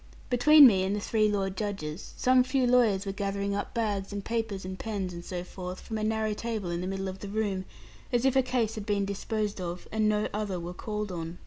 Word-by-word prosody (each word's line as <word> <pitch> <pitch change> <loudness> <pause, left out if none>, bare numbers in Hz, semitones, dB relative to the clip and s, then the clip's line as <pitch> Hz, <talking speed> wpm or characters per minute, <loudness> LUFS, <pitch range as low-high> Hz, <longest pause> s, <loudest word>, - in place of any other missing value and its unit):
Between 290 +4 +8
me 200 -7 +6
and 195 +2 0
the - - -1
three 215 +1 +2
lord 195 -2 -1
judges, 195 -5 -4
some 255 0 +5
few 260 0 +1
lawyers 230 -5 +3
were 195 - -2
gathering 200 0 -2
up 200 - -4
bags 205 -4 -1
and 200 -1 -5
papers 225 -5 -2
and 185 0 -6
pens 200 -5 -3
and 170 0 -7
so 175 0 -4
forth, 180 0 -7
from 220 -2 -5
a - - -2
narrow 220 0 0
table 215 -5 -3
in 170 0 -2
the 180 - -3
middle 195 0 -3
of 190 0 -6
the 200 - -7
room, 200 -3 -1 0.5
as 245 +1 +2
if 265 -1 +3
a 265 - +6
case 250 -4 0
had 215 -1 -6
been 200 -1 +1
disposed 205 0 -2
of, 175 0 -5
and 215 -1 +2
no 210 0 +1
other 205 -3 -2
were 170 +1 -6
called 210 +1 -4
on. 165 0 -5
205 Hz, 235 wpm, -29 LUFS, 190-220 Hz, 0.5 s, Between